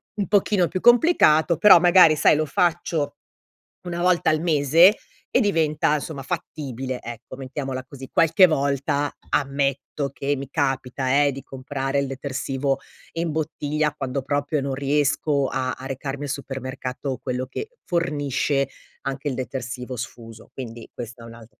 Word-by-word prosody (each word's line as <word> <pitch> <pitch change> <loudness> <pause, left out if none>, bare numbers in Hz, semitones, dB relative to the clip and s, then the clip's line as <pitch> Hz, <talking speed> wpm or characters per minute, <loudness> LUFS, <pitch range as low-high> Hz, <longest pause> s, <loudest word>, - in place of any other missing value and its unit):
un 200 -4 -2
pochino 200 -2 +3
più 185 - -3
complicato. 230 - +5
Però 200 -1 +8
magari 175 -2 +6
sai, 150 - +4
lo 155 +1 +1
faccio 160 -2 0 0.7
una 175 -1 -4
volta 180 -3 +3
al 155 0 +1
mese 165 - +5 0.4
e - - +4
diventa 155 - +2
insomma 145 -1 -4
fattibile, 130 -2 -5
ecco 120 +2 -9
mettiamola 130 -1 -5
così. 135 -1 -11
Qualche 165 +3 +6
volta 140 -1 0 0.2
ammetto 140 0 -1
che 140 +1 -1
mi 135 -1 -6
capita, 135 -1 0
eh, 140 - +3
di 135 0 -7
comprare 135 +1 -3
il 140 - -2
detersivo 135 0 -2 0.3
in 165 0 -2
bottiglia, 150 -1 -1
quando 135 -1 -3
proprio 145 +2 -1
non 135 -1 -2
riesco 145 0 +1
a 130 -1 -2
a 130 - -9
recarmi 135 +1 -5
al 140 - -4
supermercato, 130 -1 -5
quello 125 0 -3
che 435 - -6 0.2
fornisce 145 -5 0 0.3
anche 135 +2 -3
il 130 - -2
detersivo 125 0 -5
sfuso, 115 -1 -9
quindi 120 -3 -8
questa 120 0 -8
è - - -10
un'al 115 -1 -12
140 Hz, 145 wpm, -23 LUFS, 130-155 Hz, 0.7 s, Però